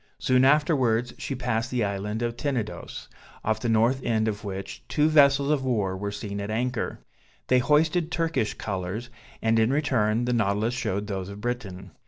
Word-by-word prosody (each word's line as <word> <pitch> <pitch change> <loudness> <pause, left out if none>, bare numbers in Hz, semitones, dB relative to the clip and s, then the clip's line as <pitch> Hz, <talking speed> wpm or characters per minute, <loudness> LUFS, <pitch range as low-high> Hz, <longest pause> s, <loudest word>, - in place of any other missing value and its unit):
Soon 130 0 +3
afterwards 130 -5 +3
she 135 - -3
passed 120 -1 -1
the 125 -3 0
island 105 +3 -2
of 120 0 -2
Tenedos, 120 -4 -4 0.4
off 110 0 +1
the 120 - -2
north 115 +4 +3
end 110 -3 +1
of 105 0 -3
which, 95 -1 -6
two 150 0 +2
vessels 140 -2 +5
of 145 -3 +1
war 105 -7 0
were 100 +2 -3
seen 100 -1 -5
at 100 - -5
anchor; 120 +2 -2 0.5
they 130 - +5
hoisted 155 +5 +2
Turkish 165 -10 0
colours, 100 +4 -4 0.3
and 115 0 +3
in 110 +3 +3
return 120 -6 +1
the 125 - 0
Nautilus 110 +1 +1
showed 100 -4 -2
those 95 -2 -4
of 100 0 -8
Britain. 100 -6 -5
115 Hz, 175 wpm, -26 LUFS, 105-130 Hz, 0.5 s, vessels